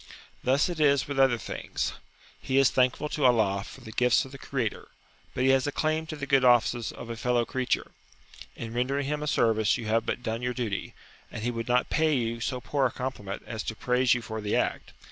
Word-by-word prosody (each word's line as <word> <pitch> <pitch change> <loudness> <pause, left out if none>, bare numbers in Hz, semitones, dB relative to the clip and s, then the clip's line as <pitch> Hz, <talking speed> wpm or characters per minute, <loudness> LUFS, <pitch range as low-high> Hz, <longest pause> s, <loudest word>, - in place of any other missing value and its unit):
Thus 135 +3 +3
it 175 -3 -4
is 140 -3 +3
with 140 -1 -3
other 135 -3 +5
things. - - -4 0.5
He 130 - 0
is 135 -2 +5
thankful 130 +3 +2
to 150 - -2
Allah 110 -6 +3
for 130 - -12
the 110 -3 -10
gifts 125 +3 +3
of 130 - -12
the 135 - -10
Creator, 125 -7 -3 0.5
but 125 - 0
he 135 - +5
has 135 0 +2
a - - 0
claim 155 +2 -1
to 155 - -5
the 140 -2 -5
good 135 -2 +3
offices 120 -1 +3
of 115 - -8
a - - -4
fellow 120 0 +1
creature. 130 +2 -1 0.6
In 115 -1 -6
rendering 135 +4 0
him 150 +1 -2
a 150 - -3
service 110 -5 +2
you 115 - -6
have 115 +1 +1
but 125 - -2
done 115 0 -2
your 125 0 -2
duty, 110 -6 -3 0.3
and 110 - -7
he 120 - 0
would 115 -1 -4
not 125 0 +1
pay 155 -1 +3
you 115 -2 -1
so 125 +1 -2
poor 130 +4 +1
a - - -7
compliment 110 -7 -5
as 110 -2 -5
to 110 - -4
praise 125 +2 +2
you 120 - -4
for 110 +1 -5
the 105 0 -1
act. - - -1
125 Hz, 230 wpm, -28 LUFS, 115-135 Hz, 0.6 s, other